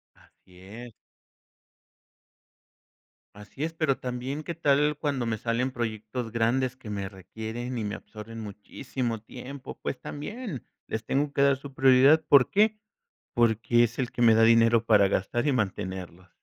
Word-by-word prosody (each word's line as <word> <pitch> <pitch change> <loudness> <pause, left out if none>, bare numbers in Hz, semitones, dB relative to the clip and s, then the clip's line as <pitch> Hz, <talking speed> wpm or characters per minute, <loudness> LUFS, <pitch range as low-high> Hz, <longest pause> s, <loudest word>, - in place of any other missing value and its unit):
Así 90 -1 -23
es. 115 +5 -10 2.4
Así 105 +7 -10
es, 165 - -3
pero 155 -5 0
también. 130 +3 -4
¿qué 170 - -5
tal 150 -1 +2
cuando 140 -5 -1
me 110 -2 -2
salen 120 +3 -1
proyectos 115 -1 -4
grandes 120 +3 +1
que 125 -5 -10
me 100 -2 -3
requieren 110 +5 -6
y 110 - -2
me 105 0 -3
absorben 115 +1 -10
muchísimo 115 +3 -5
tiempo?, 130 +5 -9
pues 130 - -4
también, 180 - -6 0.2
les 110 0 -4
tengo 140 +5 0
que 140 - +1
dar 140 -1 +4
su 140 +1 -11
prioridad, 135 +4 +5
¿por 140 -3 +6
qué?, 215 +1 +2 0.5
porque 120 0 +3
es 120 0 -1
el 125 -3 -2
que - - -5
me 115 -2 +6
da 115 - +5
dinero 115 0 +5
para 100 -3 +5
gastar 110 +8 -1
y 145 - +3
mantenerlos. 95 -5 -4
120 Hz, 155 wpm, -27 LUFS, 110-135 Hz, 2.4 s, por